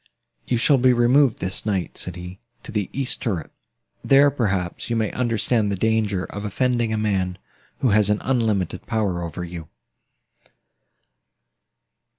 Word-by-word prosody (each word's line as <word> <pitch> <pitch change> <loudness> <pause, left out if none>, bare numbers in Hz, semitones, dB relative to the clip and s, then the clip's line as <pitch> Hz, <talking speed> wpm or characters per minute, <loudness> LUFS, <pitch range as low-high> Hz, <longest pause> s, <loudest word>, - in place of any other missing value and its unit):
"You 120 - +1
shall 135 +4 +4
be 130 0 +5
removed, 120 +1 +4
this 95 0 -3
night," 95 -5 -2
said 90 - -4
he, 90 +2 -9 0.2
"to - - -9
the 105 -3 -2
east 135 0 -1
turret: 100 -10 -3 0.5
there, 140 +1 +5
perhaps, 100 -10 -2
you 115 - 0
may 110 -2 0
understand 115 -3 0
the - - 0
danger 105 -2 0
of 100 - -7
offending 120 +2 0
a 110 - 0
man, 95 -4 -1 0.4
who 130 - +3
has 105 -1 +4
an 105 - +3
unlimited 110 -8 -1
power 105 -6 -1
over 85 +1 -5
you." 85 -2 -8
105 Hz, 150 wpm, -23 LUFS, 95-120 Hz, 0.5 s, be